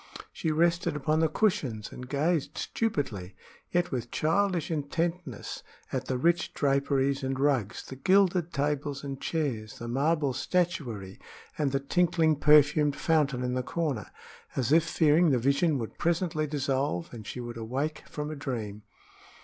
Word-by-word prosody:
She 160 Hz, -, -2 dB
rested 170 Hz, +1 st, +2 dB
upon 155 Hz, +2 st, +1 dB
the 160 Hz, -, +4 dB
cushions 145 Hz, -, 0 dB
and 125 Hz, 0 st, -9 dB
gazed 150 Hz, +1 st, 0 dB
stupidly, 130 Hz, -, -2 dB, 0.3 s
yet 175 Hz, 0 st, 0 dB
with 120 Hz, -3 st, -3 dB
childish 175 Hz, +1 st, +1 dB
intentness, 160 Hz, -, -3 dB, 0.3 s
at 130 Hz, -1 st, -1 dB
the 130 Hz, -, 0 dB
rich 170 Hz, +6 st, +1 dB
draperies 140 Hz, 0 st, +1 dB
and 135 Hz, 0 st, -2 dB
rugs, 135 Hz, -7 st, +1 dB
the 130 Hz, -, -8 dB
gilded 185 Hz, 0 st, +3 dB
tables 145 Hz, -1 st, -1 dB
and 135 Hz, -1 st, -6 dB
chairs, 130 Hz, -10 st, -2 dB
the 115 Hz, -, -6 dB
marble 140 Hz, +3 st, +1 dB
statuary 125 Hz, -, -2 dB, 0.4 s
and 145 Hz, -3 st, 0 dB
the 135 Hz, -, +1 dB
tinkling 160 Hz, +2 st, +2 dB
perfumed 150 Hz, 0 st, +5 dB
fountain 145 Hz, -6 st, +1 dB
in 125 Hz, 0 st, -1 dB
the 130 Hz, -, 0 dB
corner, 140 Hz, -4 st, -2 dB, 0.5 s
as 130 Hz, 0 st, 0 dB
if 160 Hz, +1 st, +6 dB
fearing 160 Hz, +1 st, +4 dB
the 135 Hz, -, +3 dB
vision 140 Hz, +5 st, +2 dB
would 115 Hz, -3 st, -6 dB
presently 165 Hz, -2 st, 0 dB
dissolve 135 Hz, -, -1 dB
and 110 Hz, -3 st, -9 dB
she -, -, -5 dB
would 120 Hz, -1 st, -6 dB
awake 135 Hz, +7 st, -3 dB
from 150 Hz, 0 st, -4 dB
a -, -, -4 dB
dream. 115 Hz, -7 st, -4 dB
145 Hz, 150 wpm, -28 LUFS, 130-165 Hz, 0.5 s, if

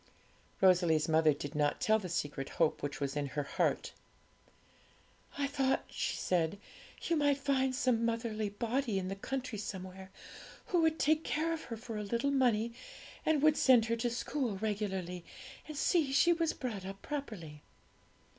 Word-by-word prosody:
Rosalie's 175 Hz, -5 st, +4 dB
mother 160 Hz, -1 st, +4 dB
did 145 Hz, 0 st, -5 dB
not 150 Hz, -1 st, +1 dB
tell 220 Hz, 0 st, +3 dB
the 185 Hz, -4 st, -6 dB
secret 145 Hz, -4 st, -3 dB
hope 160 Hz, -2 st, +2 dB
which 145 Hz, -1 st, -4 dB
was 140 Hz, -1 st, -2 dB
in 145 Hz, -1 st, -1 dB
her 145 Hz, +2 st, -2 dB
heart. -, -, 0 dB, 1.5 s
'I 285 Hz, -, +1 dB
thought,' 275 Hz, -1 st, 0 dB
she -, -, -2 dB
said, 170 Hz, 0 st, 0 dB, 0.5 s
'you 335 Hz, -, +1 dB
might 290 Hz, -2 st, +3 dB
find 265 Hz, -2 st, +1 dB
some 250 Hz, -3 st, +2 dB
motherly 230 Hz, -2 st, -1 dB
body 230 Hz, +2 st, -1 dB
in 185 Hz, -1 st, -2 dB
the 195 Hz, -, -3 dB
country 255 Hz, +1 st, -4 dB
somewhere, 190 Hz, -1 st, -7 dB, 0.6 s
who 350 Hz, -2 st, +3 dB
would 320 Hz, 0 st, +2 dB
take 310 Hz, +2 st, +2 dB
care 325 Hz, +2 st, 0 dB
of 320 Hz, -, -5 dB
her 230 Hz, -, -6 dB
for 230 Hz, +1 st, -8 dB
very 210 Hz, -1 st, -4 dB
little 235 Hz, +6 st, 0 dB
money, 235 Hz, -4 st, +2 dB, 0.5 s
and 305 Hz, -2 st, +3 dB
would 310 Hz, -1 st, +5 dB
send 245 Hz, -4 st, +6 dB
her 230 Hz, 0 st, 0 dB
to 240 Hz, +1 st, 0 dB
school 240 Hz, -2 st, -2 dB
regularly, 190 Hz, -4 st, -3 dB, 0.4 s
and 305 Hz, -2 st, -7 dB
see 315 Hz, -2 st, +2 dB
she 340 Hz, +6 st, +5 dB
was 330 Hz, -1 st, +1 dB
brought 225 Hz, -7 st, -5 dB
up 195 Hz, +1 st, -8 dB
properly.' 200 Hz, -, -6 dB
225 Hz, 165 wpm, -33 LUFS, 185-275 Hz, 1.5 s, send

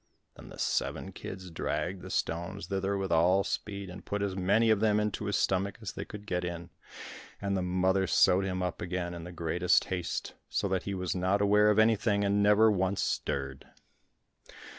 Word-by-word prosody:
Then -, -, -12 dB
the -, -, -11 dB
seven -, -, -1 dB
kids 95 Hz, -2 st, -8 dB
dragged 90 Hz, +3 st, -3 dB
the -, -, -9 dB
stones 85 Hz, +4 st, -2 dB
thither 100 Hz, 0 st, -1 dB
with 95 Hz, -2 st, -3 dB
all 90 Hz, +4 st, +4 dB
speed, 100 Hz, -1 st, -4 dB
and 90 Hz, +1 st, -9 dB
put 100 Hz, 0 st, -2 dB
as 100 Hz, -2 st, -2 dB
many 100 Hz, +5 st, +3 dB
of 110 Hz, -, +3 dB
them 105 Hz, -1 st, +3 dB
into 105 Hz, 0 st, -2 dB
his 100 Hz, -, -1 dB
stomach 95 Hz, +1 st, 0 dB
as 110 Hz, -3 st, -5 dB
they -, -, -6 dB
could 105 Hz, -1 st, -10 dB
get 90 Hz, -3 st, -2 dB
in; 85 Hz, -1 st, -5 dB, 0.7 s
and 100 Hz, -1 st, -1 dB
the 95 Hz, -, 0 dB
mother 95 Hz, +1 st, +1 dB
sewed 95 Hz, +2 st, +4 dB
him 95 Hz, -1 st, -2 dB
up 90 Hz, -2 st, -3 dB
again 90 Hz, 0 st, -3 dB
in 85 Hz, -1 st, -7 dB
the 90 Hz, -, -8 dB
greatest 85 Hz, +1 st, +2 dB
haste, 90 Hz, -2 st, -3 dB, 0.2 s
so -, -, 0 dB
that 95 Hz, -1 st, -1 dB
he 100 Hz, -, -3 dB
was 90 Hz, -2 st, -2 dB
not 95 Hz, +2 st, +1 dB
aware 105 Hz, +1 st, +4 dB
of 105 Hz, -, +3 dB
anything 110 Hz, -2 st, +3 dB
and 100 Hz, 0 st, +2 dB
never 105 Hz, +2 st, +5 dB
once 95 Hz, 0 st, 0 dB
stirred. 70 Hz, -1 st, -3 dB
95 Hz, 195 wpm, -30 LUFS, 90-100 Hz, 0.7 s, never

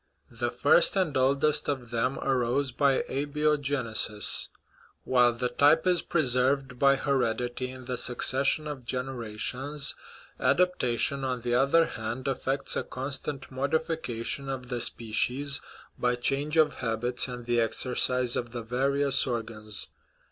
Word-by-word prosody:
The -, -, -2 dB
first -, -, +3 dB
and 185 Hz, -7 st, 0 dB
oldest 140 Hz, +3 st, +2 dB
of 130 Hz, -5 st, -3 dB
them 120 Hz, +3 st, 0 dB
arose 130 Hz, +1 st, 0 dB
by 140 Hz, +1 st, +2 dB
abiogenesis. 140 Hz, -6 st, 0 dB, 0.6 s
While 125 Hz, -2 st, +3 dB
the 125 Hz, +1 st, -2 dB
type 145 Hz, +7 st, +4 dB
is 180 Hz, -1 st, +3 dB
preserved 130 Hz, -3 st, +1 dB
by 140 Hz, 0 st, +5 dB
hered 130 Hz, -5 st, 0 dB
ity 125 Hz, +1 st, -4 dB
in 130 Hz, 0 st, -10 dB
the 125 Hz, 0 st, -3 dB
succession 135 Hz, +5 st, +1 dB
of 145 Hz, -4 st, -6 dB
generations, 130 Hz, +3 st, -2 dB, 0.5 s
adaptation, 140 Hz, -6 st, +1 dB
on 130 Hz, -2 st, -2 dB
the 120 Hz, 0 st, -2 dB
other 140 Hz, +6 st, +4 dB
hand, 115 Hz, +2 st, -5 dB
effects 135 Hz, +1 st, -1 dB
a -, -, 0 dB
constant 135 Hz, +1 st, -6 dB
modification 140 Hz, -2 st, -2 dB
of 125 Hz, -2 st, -5 dB
the 120 Hz, -2 st, -2 dB
species 125 Hz, +6 st, 0 dB, 0.4 s
by 125 Hz, 0 st, +1 dB
change 140 Hz, +5 st, 0 dB
of 155 Hz, -2 st, +3 dB
habits 120 Hz, +2 st, 0 dB
and 125 Hz, -1 st, -7 dB
the 120 Hz, -1 st, +2 dB
exercise 125 Hz, +2 st, +1 dB
of 120 Hz, -1 st, -4 dB
the 120 Hz, -1 st, -5 dB
various 135 Hz, +4 st, +2 dB
or 120 Hz, -2 st, -1 dB
gans. 110 Hz, -2 st, -5 dB
130 Hz, 135 wpm, -28 LUFS, 120-140 Hz, 0.6 s, by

